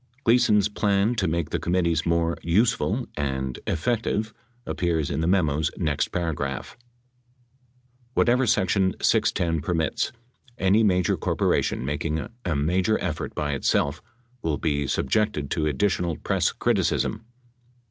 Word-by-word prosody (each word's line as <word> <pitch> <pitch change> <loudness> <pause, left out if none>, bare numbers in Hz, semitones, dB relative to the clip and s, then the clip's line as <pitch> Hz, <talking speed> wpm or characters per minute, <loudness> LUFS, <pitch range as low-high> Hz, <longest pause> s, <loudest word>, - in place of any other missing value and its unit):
Gleason's 110 -4 +4
plan 105 +1 +1
to 100 -6 0
make 80 -1 -1
the 85 - 0
committees 85 -2 0
more 85 0 +1
"useful" 110 +5 +1
and 65 -3 -2
"effective" 110 +3 -1 0.3
appears 85 -5 -1
in 70 - -1
the 80 - 0
memo's 80 -5 +2
next 75 -3 0
paragraph: 70 -6 -3 1.4
Whatever 125 +1 +3
section 95 -2 +2
610 80 -3 +1
permits, 80 -1 -1 0.5
any 100 +2 +3
major 90 -5 +2
corporation - - 0
mak 75 +1 -2
ing 80 -1 -2 0.2
a 90 -4 -1
major 90 +9 +1
effort 80 -4 -4
by 75 -1 -1
itself 70 +2 0 0.4
will 80 -6 -1
be 70 -2 -1
subjected 75 0 0
to 75 -2 0
additional 85 +1 0
press - - 0
criticism. 110 +1 0
85 Hz, 125 wpm, -25 LUFS, 75-100 Hz, 1.4 s, Gleason's